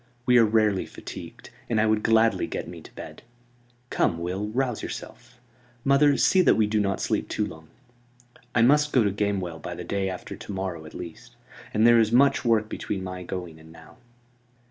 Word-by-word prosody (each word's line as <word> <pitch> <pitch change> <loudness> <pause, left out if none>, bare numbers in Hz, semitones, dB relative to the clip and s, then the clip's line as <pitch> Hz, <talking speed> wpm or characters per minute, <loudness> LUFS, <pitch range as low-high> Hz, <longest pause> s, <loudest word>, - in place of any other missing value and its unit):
We 125 -1 +5
are 115 - +6
rarely 105 -3 +1
fatigued, - - -10 0.2
and 115 -2 +1
I 110 - +3
would 110 -1 +2
gladly 115 +1 +3
get - - -5
me - - -9
to - - -16
bed. - - -9 0.7
Come, 85 - +1
Will, 90 +5 -3
rouse 125 +1 -1
yourself. 120 +1 -9 0.4
Mother, 140 +1 +4
see 190 - +4
that - - +4
we 110 - +3
do 105 +1 0
not 100 -1 0
sleep - - -1
too 105 - -1
long. 80 -4 -11 0.9
I 115 - +4
must 150 +4 +4
go 125 - +5
to 100 - +1
Gamewell 95 -5 -2
by - - -6
the - - -7
day 100 -1 -2
after 90 - -7
to - - -9
morrow 95 -4 -4
at - - -13
least; 85 -2 -10 0.4
and 110 +1 +2
there 120 0 +7
is 110 -1 +2
much 135 +4 +4
work 115 -3 +2
between 95 -2 -4
my 90 0 -6
going 90 -3 -6
and 80 0 -15
now." 80 -1 -16
105 Hz, 195 wpm, -25 LUFS, 95-120 Hz, 0.9 s, there